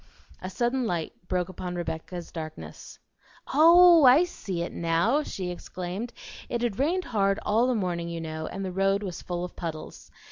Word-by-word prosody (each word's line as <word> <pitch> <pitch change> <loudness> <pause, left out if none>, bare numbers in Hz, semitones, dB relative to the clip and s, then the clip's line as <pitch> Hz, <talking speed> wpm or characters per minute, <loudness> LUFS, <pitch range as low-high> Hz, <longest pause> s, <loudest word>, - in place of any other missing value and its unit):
A 185 - -5
sudden 240 +4 0
light 170 -4 -2
broke 180 -1 0
upon 180 -1 -6
Rebecca's 170 +1 -5
darkness. 155 -2 -8 0.6
"Oh! 340 +1 +8
I 265 +6 +7
see 190 - -4
it 170 - -5
now," 170 - +1
she 185 -10 -5
exclaimed. 185 +5 -6 0.4
"It 240 0 -2
had 230 -3 -1
rained 350 +7 +1
hard 195 -3 +1
all 225 +4 +3
the 255 - +1
morning, 175 -4 -2
you 170 0 -4
know, 160 -1 -5
and 195 +1 -5
the 185 - -3
road 195 +2 +1
was 185 -4 -5
full 175 -1 -4
of 180 - -10
puddles. 160 -3 -7
185 Hz, 175 wpm, -27 LUFS, 170-240 Hz, 0.6 s, Oh